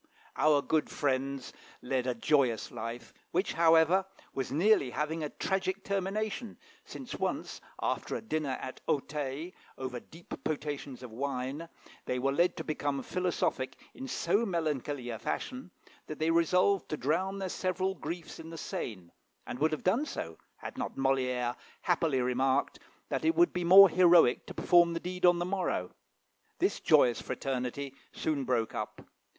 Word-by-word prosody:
Our 150 Hz, -2 st, +4 dB
good 155 Hz, -1 st, +1 dB
friends 135 Hz, -1 st, -1 dB, 0.3 s
led 130 Hz, 0 st, -1 dB
a 125 Hz, -, 0 dB
joyous 125 Hz, -2 st, +2 dB
life, 115 Hz, +1 st, -6 dB, 0.2 s
which, 185 Hz, +4 st, 0 dB
however, 165 Hz, +3 st, +5 dB, 0.3 s
was 135 Hz, -2 st, -3 dB
nearly 165 Hz, -2 st, +4 dB
having 155 Hz, +4 st, -2 dB
a 150 Hz, -, -2 dB
tragic 190 Hz, +2 st, -2 dB
termination, 205 Hz, +3 st, -2 dB, 0.3 s
since -, -, -8 dB
once, -, -, -3 dB, 0.2 s
after -, -, -1 dB
a -, -, -3 dB
dinner 155 Hz, -9 st, -1 dB
at 130 Hz, -, -7 dB
Auteuil, 145 Hz, +3 st, -2 dB, 0.3 s
over 130 Hz, -2 st, -4 dB
deep 165 Hz, +7 st, -13 dB
potations 145 Hz, -4 st, -4 dB
of 125 Hz, -, -8 dB
wine, 135 Hz, +5 st, -3 dB, 0.4 s
they 125 Hz, -, -1 dB
were 135 Hz, +2 st, +1 dB
led 175 Hz, +5 st, +2 dB
to -, -, -3 dB
become 145 Hz, -3 st, -2 dB
philosophic 180 Hz, -7 st, -1 dB, 0.2 s
in 265 Hz, -, -7 dB
so 205 Hz, -2 st, +1 dB
melancholy 150 Hz, -, -2 dB
a 110 Hz, -, -5 dB
fashion, 255 Hz, -, -4 dB, 0.4 s
that 155 Hz, -, -6 dB
they 160 Hz, +1 st, +1 dB
resolved 180 Hz, +3 st, +3 dB
to 155 Hz, -, -2 dB
drown 180 Hz, +9 st, 0 dB
their 195 Hz, -1 st, -3 dB
several 185 Hz, +1 st, -1 dB
griefs 170 Hz, -1 st, -6 dB
in 165 Hz, 0 st, -8 dB
the 165 Hz, -, -8 dB
Seine, 95 Hz, -, -5 dB, 0.3 s
and 125 Hz, -, -6 dB
would 155 Hz, +2 st, +3 dB
have 155 Hz, -, -3 dB
done 235 Hz, +12 st, +2 dB
so, 80 Hz, -1 st, -6 dB, 0.2 s
had -, -, -8 dB
not -, -, -3 dB
Molière 125 Hz, -2 st, +1 dB, 0.3 s
happily 165 Hz, -7 st, +1 dB
remarked 130 Hz, +2 st, +1 dB, 0.3 s
that -, -, -1 dB
it 325 Hz, +1 st, +3 dB
would 345 Hz, +1 st, +4 dB
be 180 Hz, -, -1 dB
more 190 Hz, +3 st, +10 dB
heroic 175 Hz, -7 st, +5 dB
to -, -, -8 dB
perform 175 Hz, -1 st, +5 dB
the -, -, -1 dB
deed 180 Hz, +1 st, 0 dB
on 175 Hz, 0 st, +5 dB
the 175 Hz, -, -1 dB
morrow. 180 Hz, -, -1 dB, 0.7 s
This -, -, +1 dB
joyous 120 Hz, -2 st, +4 dB
fraternity 135 Hz, +1 st, -3 dB, 0.2 s
soon 145 Hz, -4 st, -1 dB
broke 120 Hz, -3 st, 0 dB
up. 105 Hz, -, -5 dB
155 Hz, 160 wpm, -31 LUFS, 130-180 Hz, 0.7 s, more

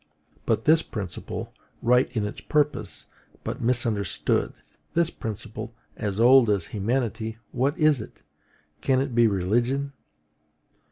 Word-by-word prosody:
But 110 Hz, -, +1 dB
this 160 Hz, +1 st, +5 dB
principle, 100 Hz, -, -6 dB, 0.3 s
right 125 Hz, +2 st, +4 dB
in 105 Hz, -, +1 dB
its 105 Hz, -, -6 dB
purpose, 150 Hz, -1 st, 0 dB, 0.4 s
but -, -, -4 dB
misunderstood: 115 Hz, -6 st, +1 dB, 0.4 s
this 170 Hz, 0 st, +2 dB
principle, 110 Hz, +1 st, -6 dB, 0.2 s
as 105 Hz, -1 st, -2 dB
old 125 Hz, 0 st, +7 dB
as 100 Hz, -5 st, +1 dB
humanity, 110 Hz, 0 st, -1 dB
what 135 Hz, +6 st, 0 dB
is 155 Hz, -6 st, +3 dB
it? -, -, -12 dB, 0.6 s
Can 130 Hz, -1 st, +2 dB
it 135 Hz, -1 st, -2 dB
be 120 Hz, 0 st, +5 dB
religion? 120 Hz, +9 st, 0 dB
120 Hz, 120 wpm, -25 LUFS, 105-135 Hz, 0.6 s, old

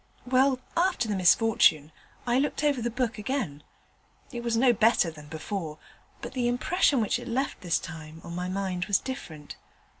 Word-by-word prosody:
Well, 260 Hz, +1 st, +3 dB, 0.2 s
after 355 Hz, -7 st, +1 dB
the 210 Hz, -, -1 dB
misfortune, 180 Hz, -5 st, +4 dB, 0.3 s
I 245 Hz, +1 st, +2 dB
looked 290 Hz, +2 st, -1 dB
over 285 Hz, -4 st, +2 dB
the 240 Hz, -, -1 dB
book 235 Hz, -2 st, -2 dB
again. 210 Hz, -, -3 dB, 0.7 s
It 240 Hz, -3 st, -5 dB
was 235 Hz, -1 st, 0 dB
no 245 Hz, +1 st, +5 dB
better 220 Hz, -6 st, +3 dB
than 150 Hz, -2 st, -13 dB
before, 160 Hz, 0 st, -5 dB, 0.5 s
but -, -, -6 dB
the 250 Hz, -2 st, 0 dB
impression 265 Hz, +2 st, +2 dB
which 215 Hz, +2 st, 0 dB
it 245 Hz, -, -9 dB
left 260 Hz, +3 st, -2 dB
this 175 Hz, -2 st, +1 dB
time 160 Hz, -2 st, -9 dB
on 170 Hz, -, -8 dB
my 180 Hz, +1 st, -3 dB
mind 185 Hz, -2 st, -2 dB
was 200 Hz, -1 st, +3 dB
different. 160 Hz, -, -8 dB
225 Hz, 175 wpm, -27 LUFS, 175-255 Hz, 0.7 s, no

